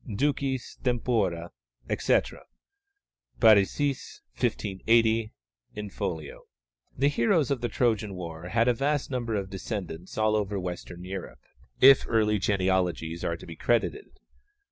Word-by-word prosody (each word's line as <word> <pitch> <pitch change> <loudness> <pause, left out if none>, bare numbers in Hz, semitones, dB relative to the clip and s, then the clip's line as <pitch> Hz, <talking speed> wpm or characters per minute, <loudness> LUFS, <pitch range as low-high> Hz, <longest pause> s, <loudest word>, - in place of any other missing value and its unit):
ducis 135 +2 -1
tempora_, 110 -9 0 0.4
etc. - - +1 1.0
(Parisiis, 115 +6 +3
1580, 110 - +1 0.4
in 105 -1 -5
folio). 80 -6 -5 0.5
The 140 - +3
heroes 145 +1 +2
of 135 - 0
the 120 - -1
Trojan 110 -4 0
war 85 -1 -7
had 115 +3 +2
a 125 - +5
vast 140 +3 -1
number 120 -4 -2
of 95 -2 -3
descendants 95 -3 -6
all 110 0 +2
over 105 -1 -1
Western 90 -1 -6
Europe, 95 0 -7 0.4
if 135 0 +8
early 105 -2 +2
genealogies 90 -4 0
are 85 - -1
to - - -12
be 85 - -9
credited. 120 - -1
105 Hz, 120 wpm, -27 LUFS, 90-120 Hz, 1.0 s, if